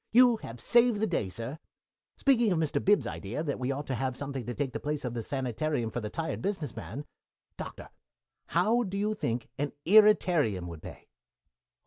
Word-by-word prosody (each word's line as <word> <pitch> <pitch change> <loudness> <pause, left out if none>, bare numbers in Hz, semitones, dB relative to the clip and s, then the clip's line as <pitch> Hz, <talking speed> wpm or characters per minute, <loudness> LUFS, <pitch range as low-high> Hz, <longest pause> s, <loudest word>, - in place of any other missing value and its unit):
You 245 0 +6
have 115 - -9
saved 235 - +4
the 220 - +2
day, 165 - -1
Sir. 115 - -5 0.6
Speaking 240 -6 +3
of 180 - +2
Mr. 160 -2 0
Bib's 205 +1 +4
idea 115 +10 -4
that 145 -5 -2
we 130 +1 -1
ought 140 +2 -3
to 135 - -3
have 130 +1 -2
something 135 -4 -5
to 120 - -3
take 135 -4 -2
the - - -3
place 150 -2 -3
of 125 - -3
the 120 - -3
sanitarium 130 0 -2
for 120 - -3
the 105 - -4
tired 165 +6 -3
business 185 - -3
man, 115 +5 -6 0.5
Doctor, - - -7 0.6
how 235 +3 +3
do 200 -4 -3
you 210 +2 +1
think 120 - -2
an 145 0 -1
irritarium 175 - +5
would 85 -3 -8
pay?" - - -11
145 Hz, 190 wpm, -29 LUFS, 120-205 Hz, 0.6 s, You